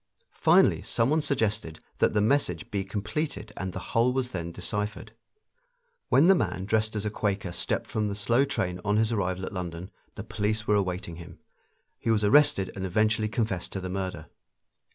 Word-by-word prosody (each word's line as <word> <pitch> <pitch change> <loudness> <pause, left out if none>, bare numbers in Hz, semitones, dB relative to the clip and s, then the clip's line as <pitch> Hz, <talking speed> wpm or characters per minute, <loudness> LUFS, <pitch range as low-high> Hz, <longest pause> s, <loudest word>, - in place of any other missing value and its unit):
Finally - - +5
some 115 +4 0
one 155 +1 +3
suggested 110 - -1 0.2
that - - +2
the - - +4
message 105 - +1
be 100 -1 -1
completed 105 +4 -4
and 95 -1 -4
the 90 - -8
whole 120 +1 +4
was 125 -1 -1
then 85 -5 -4
deciphered. 105 +4 -4 1.0
When 140 - +5
the 190 - +7
man 95 - -1
dressed 110 +1 0
as 105 0 -2
a 105 - -1
Quaker 100 -4 -2
stepped - - -1
from 110 -2 0
the 100 - -3
slow 115 +5 +2
train 90 -10 -2
on 105 0 +1
his 110 +1 +2
arrival 95 -3 -1
at - - -7
London 90 0 -5 0.2
the 100 - -6
police 110 0 -2
were 105 - +2
awaiting 90 -4 -1
him; 85 - -11 0.6
he - - -3
was 110 -2 +3
arrested 130 -4 +4
and 95 - -5
eventually 110 +3 +1
confessed 110 -6 -2
the 95 0 -5
murder. 95 -4 -4
105 Hz, 180 wpm, -27 LUFS, 95-110 Hz, 1.0 s, the